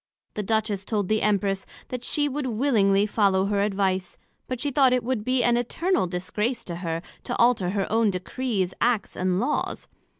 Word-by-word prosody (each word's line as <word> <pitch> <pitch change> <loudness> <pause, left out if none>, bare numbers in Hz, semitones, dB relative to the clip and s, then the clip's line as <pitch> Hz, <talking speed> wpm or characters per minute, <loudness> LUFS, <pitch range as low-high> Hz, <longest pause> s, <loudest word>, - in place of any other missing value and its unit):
The 210 - -3
Empress 215 -3 0
told 205 -3 -1
the 215 0 +2
Duchess, 200 -2 +1 0.2
that 250 -1 -5
she 290 +3 +1
would 285 -1 -3
willingly 215 -5 +3
follow 200 -3 +2
her 200 0 +1
advice; 195 -2 0 0.3
but 255 -2 -3
she 285 +2 -1
thought 265 -1 +4
it 250 - +1
would 240 -3 -1
be 255 +1 +1
an 240 0 +3
eternal 320 - 0
disgrace 210 +7 -2
to 170 -1 -5
her, 165 -1 -3 0.2
to 245 - -3
alter 235 -7 +3
her 195 0 0
own 225 -1 +3
Decrees, 190 0 -2
Acts, 235 -3 +1
and 185 0 0
Laws. 290 +7 -2
215 Hz, 180 wpm, -25 LUFS, 195-250 Hz, 0.3 s, thought